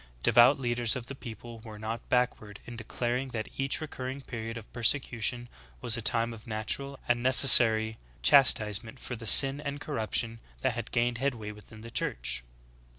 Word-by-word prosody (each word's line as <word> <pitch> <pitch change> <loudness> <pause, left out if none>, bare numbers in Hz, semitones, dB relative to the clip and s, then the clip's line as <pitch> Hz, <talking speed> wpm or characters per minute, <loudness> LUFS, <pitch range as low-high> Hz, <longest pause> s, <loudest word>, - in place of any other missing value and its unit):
Devout 120 +4 +4
leaders 120 -2 -1
of 125 -2 -7
the 135 - -10
people 120 -3 -12
were 110 -1 -12
not 110 +2 -8
backward 110 -4 -3
in 120 - -11
declaring 120 +3 -5
that 115 -4 -7
each 135 0 -2
recurring 135 -3 -8
period 115 -3 -9
of 110 - -14
persecution 120 0 -2 0.3
was 115 - -1
a 115 - -4
time 115 +1 +2
of 110 0 -15
natural 125 +5 -4
and 120 0 -1
necessary 115 -4 +5 0.2
chastise 110 - +3
ment 115 +3 -14
for 125 - -8
the 115 -1 -10
sin 135 +4 +9
and 140 0 -6
corruption 115 -5 -3 0.2
that 130 -2 -2
had 120 0 -7
gained 120 0 -2
headway 120 -6 -5
within 105 +1 -16
the 115 +1 -12
Church. - - -2
120 Hz, 170 wpm, -27 LUFS, 110-130 Hz, 0.3 s, sin